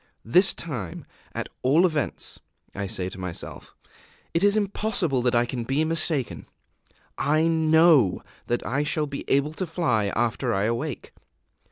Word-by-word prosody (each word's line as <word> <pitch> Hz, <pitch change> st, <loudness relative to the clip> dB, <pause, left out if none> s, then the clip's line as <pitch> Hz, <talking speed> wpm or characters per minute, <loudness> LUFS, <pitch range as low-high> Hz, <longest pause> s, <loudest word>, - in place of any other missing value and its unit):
"This 180 Hz, -, +5 dB
time, 115 Hz, -, -5 dB, 0.3 s
at -, -, -4 dB
all 150 Hz, +8 st, +4 dB
events," 155 Hz, -6 st, -2 dB, 0.3 s
I 100 Hz, 0 st, -4 dB
say 90 Hz, -1 st, -3 dB
to 95 Hz, -, -10 dB
myself, 90 Hz, -2 st, -7 dB, 0.6 s
"it 165 Hz, -, +1 dB
is 205 Hz, +1 st, +4 dB
impossible 200 Hz, -, 0 dB
that 125 Hz, 0 st, +1 dB
I 120 Hz, 0 st, +3 dB
can 120 Hz, 0 st, -4 dB
be 135 Hz, +6 st, 0 dB
mistaken; 155 Hz, -5 st, -1 dB, 0.7 s
I 155 Hz, +3 st, +2 dB
know 160 Hz, -, +4 dB, 0.2 s
that 120 Hz, -, -1 dB
I 135 Hz, +4 st, 0 dB
shall 150 Hz, +1 st, 0 dB
be 140 Hz, -1 st, -6 dB
able 140 Hz, +3 st, +2 dB
to 185 Hz, +3 st, -3 dB
fly 125 Hz, -, 0 dB
after 120 Hz, +1 st, 0 dB
I 100 Hz, -, +1 dB
awake. 115 Hz, +6 st, -3 dB
145 Hz, 150 wpm, -25 LUFS, 120-165 Hz, 0.7 s, This